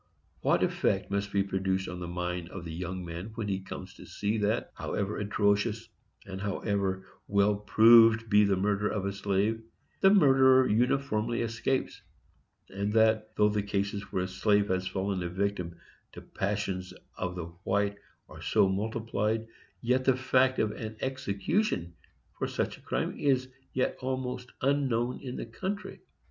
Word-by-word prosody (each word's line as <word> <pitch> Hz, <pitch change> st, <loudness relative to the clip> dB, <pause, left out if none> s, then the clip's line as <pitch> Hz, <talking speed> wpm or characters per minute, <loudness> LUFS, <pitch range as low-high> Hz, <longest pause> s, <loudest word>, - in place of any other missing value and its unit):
What -, -, +2 dB
effect -, -, 0 dB
must 100 Hz, 0 st, -1 dB
be 100 Hz, -1 st, +2 dB
produced 95 Hz, -1 st, -1 dB
on 90 Hz, 0 st, -6 dB
the 90 Hz, -, -5 dB
mind 90 Hz, 0 st, -3 dB
of 90 Hz, -2 st, -8 dB
the 80 Hz, -, -6 dB
young 90 Hz, +1 st, -5 dB
man 85 Hz, +6 st, -7 dB
when 110 Hz, -2 st, -3 dB
he 95 Hz, -2 st, -1 dB
comes 95 Hz, -, -8 dB
to -, -, -13 dB
see 105 Hz, +2 st, -2 dB
that, 105 Hz, +3 st, 0 dB
however 100 Hz, +1 st, -3 dB
atrocious 105 Hz, +2 st, 0 dB, 0.4 s
and 95 Hz, -1 st, -7 dB
however 100 Hz, -2 st, -1 dB, 0.2 s
well 100 Hz, +1 st, +3 dB
proved 115 Hz, +2 st, +6 dB
be 105 Hz, 0 st, +5 dB
the 100 Hz, -1 st, +3 dB
murder 100 Hz, +2 st, +1 dB
of 100 Hz, -3 st, -2 dB
a 100 Hz, -, -1 dB
slave, 100 Hz, +3 st, 0 dB, 0.4 s
the 195 Hz, -, +6 dB
murderer 135 Hz, -8 st, +6 dB
uniformly 120 Hz, -1 st, +1 dB
escapes; 115 Hz, +3 st, -2 dB, 0.7 s
and 100 Hz, +2 st, -2 dB
that, 110 Hz, -1 st, +3 dB
though 105 Hz, 0 st, +4 dB
the 105 Hz, 0 st, 0 dB
cases 100 Hz, 0 st, -3 dB
where 90 Hz, -, 0 dB
the -, -, -2 dB
slave 100 Hz, +2 st, +2 dB
has 95 Hz, 0 st, 0 dB
fallen 95 Hz, 0 st, -2 dB
a 85 Hz, -, -2 dB
victim 90 Hz, -2 st, -2 dB, 0.4 s
to -, -, -9 dB
passions 95 Hz, -2 st, -3 dB, 0.2 s
of 90 Hz, -1 st, -3 dB
the 90 Hz, -2 st, -4 dB, 0.2 s
white 100 Hz, +1 st, +1 dB, 0.3 s
are -, -, -12 dB
so -, -, +3 dB
multiplied, 110 Hz, +2 st, -1 dB, 0.4 s
yet 125 Hz, +2 st, +1 dB
the 130 Hz, -, +4 dB
fact 130 Hz, 0 st, +3 dB
of 110 Hz, -, +1 dB
an 110 Hz, 0 st, -7 dB
execution 130 Hz, -, -1 dB, 0.5 s
for -, -, 0 dB
such -, -, -2 dB
a -, -, -19 dB
crime -, -, -2 dB
is 130 Hz, -2 st, +1 dB, 0.2 s
yet 130 Hz, -, 0 dB
almost 130 Hz, -1 st, -4 dB
unknown 130 Hz, -3 st, +1 dB
in 130 Hz, -2 st, -6 dB
the -, -, -4 dB
country? 190 Hz, -, -5 dB
105 Hz, 160 wpm, -29 LUFS, 95-115 Hz, 0.7 s, proved